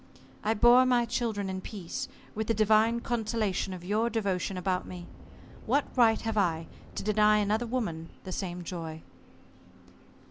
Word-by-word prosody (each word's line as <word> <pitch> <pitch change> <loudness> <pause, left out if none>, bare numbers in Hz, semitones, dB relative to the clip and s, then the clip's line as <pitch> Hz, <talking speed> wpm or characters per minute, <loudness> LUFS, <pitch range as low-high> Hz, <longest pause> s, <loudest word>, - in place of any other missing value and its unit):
I 220 +2 +1
bore 240 +4 +7
my 245 -2 +3
children 225 -4 -2
in 190 0 -4
peace, 190 -4 -5 0.3
with 220 0 -3
the 225 - +1
divine 220 +2 +3
consolation 220 -5 -1
of 180 -2 -7
your 215 +5 +1
devotion 195 -4 -1
about 180 0 -1
me. 175 -1 -8 0.6
What 285 - +1
right 230 -3 +5
have 225 -1 -1
I 165 -4 +1 0.3
to - - -3
deny 210 0 +4
another 210 +3 +1
woman 190 -10 -3
the 185 - -7
same 180 -1 -4
joy?" 165 -2 -6
210 Hz, 150 wpm, -29 LUFS, 185-225 Hz, 0.6 s, bore